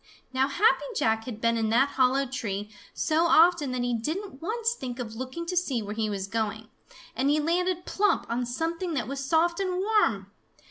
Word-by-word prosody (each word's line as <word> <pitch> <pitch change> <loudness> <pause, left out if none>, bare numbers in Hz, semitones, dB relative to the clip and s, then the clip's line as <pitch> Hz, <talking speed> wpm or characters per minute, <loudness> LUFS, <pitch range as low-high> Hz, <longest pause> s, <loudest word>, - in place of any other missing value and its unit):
Now 260 +1 +2
Happy 390 +10 +3
Jack 225 - +1
had 230 -4 -6
been 230 0 +2
in 220 -1 0
that 255 +5 +3
hollow 265 +1 +2
tree 210 -5 -4 0.2
so 320 +1 +1
often 330 -4 +5
that 250 -1 -2
he 245 0 0
didn't 310 - -4
once 455 +6 -1
think 250 - -6
of 235 -4 -5
looking 260 +8 -5
to 360 +2 -3
see 275 -10 0
where 205 0 -5
he 215 0 -1
was 195 -2 -3
going, 220 +1 -3 0.5
and 270 +2 +1
he 300 +1 +3
landed 355 +3 0
plump 410 +1 +1
on 240 +1 -2
something 330 +6 -2
that 245 -6 -2
was 275 +1 -4
soft 335 +5 +2
and 370 -2 -1
warm! 370 - +1
270 Hz, 195 wpm, -27 LUFS, 230-340 Hz, 0.5 s, often